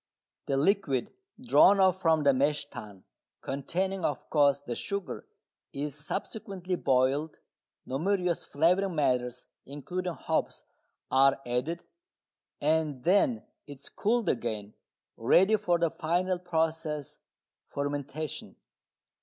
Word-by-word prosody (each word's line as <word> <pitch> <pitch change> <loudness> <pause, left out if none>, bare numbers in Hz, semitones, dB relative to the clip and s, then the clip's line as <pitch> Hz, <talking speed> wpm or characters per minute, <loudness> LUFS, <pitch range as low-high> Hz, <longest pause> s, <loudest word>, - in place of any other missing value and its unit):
The 135 - +1
liquid 145 - +1 0.3
drawn 220 -5 +5
off 190 -1 +3
from 160 -3 +3
the 140 -1 +5
mash 145 +3 +1
tun, 105 -5 -10 0.4
containing, 185 +7 -2
of 145 -4 -3
course, 145 -2 +4
the 120 -4 -5
sugar, 200 +6 -4 0.5
is 145 +1 -3
subsequently 185 - -5
boiled, 140 0 +1 0.5
numerous 180 +5 0
flavouring 180 +5 +1
matters 125 -4 0 0.2
(including 175 +6 -4
hops) - - -2 0.5
are 135 +1 +4
added, 125 +8 -2 0.8
and 150 -3 0
then 205 - +3 0.2
it 140 -2 -10
is - - -6
cooled 230 0 0
again, 105 -6 -2 0.4
ready 185 - +4
for 180 -5 +1
the 170 -2 +1
final 180 +3 0
process 160 -4 -2 0.5
fermentation. 145 +1 -4
155 Hz, 110 wpm, -29 LUFS, 135-185 Hz, 0.8 s, drawn